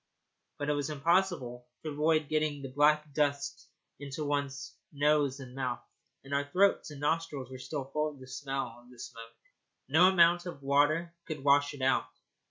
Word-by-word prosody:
But 145 - -3
it 150 - +2
was 145 -1 -2
impossible 150 -6 0 0.2
to 155 - -3
avoid 155 +1 +2
getting 155 -2 -1
the 135 - -5
black 150 +2 +2
dust 140 -1 -1 0.3
into 145 +2 -5
one's 140 -1 -2 0.2
nose 145 -1 +2
and 130 -2 -10
mouth, 130 -2 -3 0.4
and 135 +1 -7
our 140 0 0
throats 195 0 +3
and 145 -2 -9
nostrils 150 -3 -2
were 130 - -8
still 135 +2 -4
full 150 +3 -1
of 145 -2 -13
the 130 - -11
smell 135 -2 -4
of 120 0 -19
the 125 - -16
smoke. 115 -1 -10 0.5
No 160 +7 +5
amount 175 -1 +4
of 140 -5 -8
water 145 +5 +2 0.2
would 150 -4 -5
wash 145 +1 +4
it 135 - -6
out. 135 - +2
145 Hz, 175 wpm, -31 LUFS, 135-155 Hz, 0.5 s, No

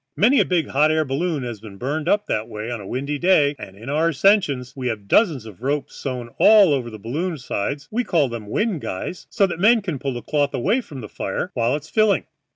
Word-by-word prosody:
Many 250 +7 +5
a - - +4
big 170 -5 0
hot 150 +3 +3
air 155 0 +1
balloon 145 +1 -1
has 120 -3 -5
been 105 -3 -11
burned 145 +7 -2
up 205 0 +2
that 110 +1 -2
way 110 +3 -5
on 120 -3 -4
a 95 - -9
windy 140 +5 -3
day, 150 -5 +3
and 95 0 -10
in 115 +4 -11
our 155 +4 +1
ascensions 150 -6 +2
we 130 -2 -3
have 105 -4 -4
dozens 155 - +3
of 110 -2 -12
ropes 140 +2 -2
sewn 125 -3 -5
all 205 -7 +7
over 125 -4 -2
the 110 - -9
balloon 155 - -3
sides; 140 +3 -3
we 240 +3 0
call 160 - +2
them 115 -3 -7
wind 205 - -1
guys, 95 - -5
so 200 - +3
that 175 -3 -4
men 225 +5 +5
can 170 -8 -3
pull 135 -1 -3
the 120 - -6
cloth 145 -2 0
away 200 - +1
from 140 - -10
the 105 - -7
fire 105 - -4
while 120 +2 +1
it's 150 +1 -6
filling. 215 0 +2
145 Hz, 240 wpm, -22 LUFS, 120-175 Hz, -, all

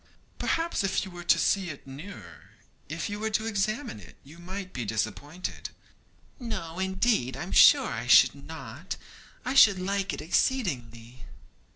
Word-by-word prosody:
'Perhaps, 330 -8 0
if 195 +1 0
you 190 - -9
were 175 0 -9
to 175 - +4
see 195 -3 +1
it 145 - -9
nearer, 145 +9 -11 0.4
if - - -3
you 205 0 -5
were 220 +1 -1
to 215 0 -1
examine 215 - -2
it, 95 - -15
you 150 +5 -15
might 185 +2 -7
be 125 - -3
disappointed.' 110 - -4 0.7
'No, 185 -9 -5
indeed, 190 - 0
I'm 175 +6 -6
sure - - +7
I - - -4
should - - +7
not; - - -8 0.5
I 255 - -1
should 200 -7 +7
like 195 +1 -1
it - - -5
exceedingly.' 125 - -1
185 Hz, 155 wpm, -28 LUFS, 140-205 Hz, 0.7 s, sure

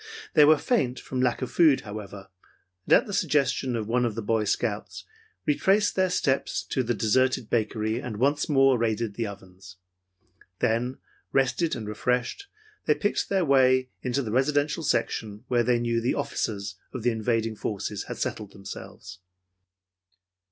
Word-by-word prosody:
They 150 - +7
were 155 +1 +6
faint 135 - 0
from 130 -1 -4
lack 125 0 +1
of 130 - -4
food, 155 -6 +4
however, 100 -2 -8 0.6
and - - +4
at - - +6
the 205 - -7
suggestion 140 -8 +1
of 110 -2 -3
one 120 +2 +1
of 115 -3 -1
the 115 - -4
Boy 110 0 +1
Scouts, - - -2 0.4
retraced 195 +7 +2
their 185 -1 +2
steps 135 -6 0
to 130 - +1
the 120 -1 -1
deserted 120 +3 +1
bakery 110 0 0
and 110 -4 -5
once 140 +7 +1
more 135 -3 +4
raided 115 -1 -1
the 115 +1 -2
ovens. 95 -2 -12 0.8
Then, 120 +3 0 0.3
rested 135 +5 +1
and 110 -4 -6
refreshed, 125 - -1 0.4
they 150 - +4
picked 205 +8 -1
their 190 -3 +2
way 130 -2 +4
into 130 +2 -1
the 110 - -4
residential 145 +6 +1
section 110 -7 -1
where 120 -1 +3
they 120 +1 +2
knew 120 -1 0
the 120 - 0
officers 100 -3 -3
of 130 - -6
the 120 - +3
invading 115 0 -1
forces 105 -1 -4
had - - -6
settled 105 -2 -4
themselves. 95 0 -10
120 Hz, 160 wpm, -26 LUFS, 110-135 Hz, 0.8 s, They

